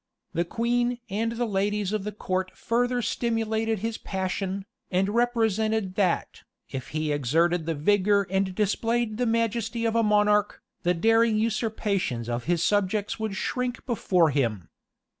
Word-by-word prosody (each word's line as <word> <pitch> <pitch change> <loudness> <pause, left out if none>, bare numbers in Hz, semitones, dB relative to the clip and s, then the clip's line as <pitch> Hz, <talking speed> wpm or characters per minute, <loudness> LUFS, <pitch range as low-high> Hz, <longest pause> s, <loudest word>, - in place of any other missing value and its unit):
The 170 +1 0
queen 240 +4 0
and 225 +3 -1
the 240 +1 -1
ladies 205 -1 0
of 210 -2 -2
the 210 - -2
court 185 -2 -2
further 245 +1 0
stimulated 225 -1 0
his 225 -1 -3
passion, 190 0 -3 0.2
and 190 +2 +1
represented 220 -4 +1
that, 185 -3 0 0.3
if 130 -1 -5
he 155 0 -2
exerted 160 +5 +1
the 165 - 0
vigor 200 +5 +3
and 190 -1 0
displayed 220 +2 0
the 245 0 +1
majesty 230 0 0
of 225 0 +1
a 230 - +4
monarch, 210 -1 +3 0.2
the 180 +1 +1
daring 225 +4 +3
usurpations 210 - -1
of 120 0 -2
his 170 0 +1
subjects 205 +1 0
would 220 -3 -2
shrink 250 +5 -2
before 180 - +2
him. 115 - -1
210 Hz, 145 wpm, -26 LUFS, 185-225 Hz, 0.3 s, a